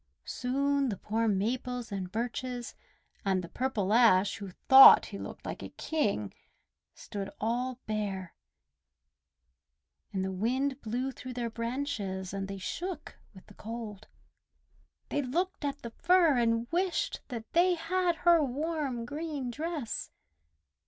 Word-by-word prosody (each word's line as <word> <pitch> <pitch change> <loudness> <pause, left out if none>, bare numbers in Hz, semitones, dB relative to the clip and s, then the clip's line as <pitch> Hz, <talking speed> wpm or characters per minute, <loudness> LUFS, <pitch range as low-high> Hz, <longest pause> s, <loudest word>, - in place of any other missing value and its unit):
Soon 275 +2 0
the 200 - -3
poor 225 +4 -1
Maples 235 +4 -1
and 190 -2 -4
Birches 245 +2 -3 0.5
and 190 -2 +1
the - - -6
purple 215 -3 -1
Ash 220 -5 +5
who 200 -1 -7
thought 265 +8 +9
he - - -7
looked - - -8
like - - -5
a - - -6
King 210 - -1 0.6
stood 200 -1 -6
all 245 +3 -1
bare, 200 -4 -3 1.8
and 190 -1 -1
the 190 - -2
wind 255 +8 -1
blew 245 +4 -2
through 255 0 -8
their 235 -2 -3
branches, 230 -6 -3
and 195 -1 -3
they 195 0 -5
shook 350 - -5 0.2
with 190 - -14
the 210 - -16
cold. 220 -2 -7 1.0
They 290 - 0
looked 340 +8 -2
at 280 -1 -3
the 235 - -6
Fir 335 +2 +4
and 230 0 +1
wished 360 +1 0
that 230 -4 -7
they 355 +1 +4
had 345 +1 0
her 340 -2 +6
warm, 280 -3 -2
green 290 -2 -4
dress. 305 -2 -4
245 Hz, 135 wpm, -30 LUFS, 210-285 Hz, 1.8 s, thought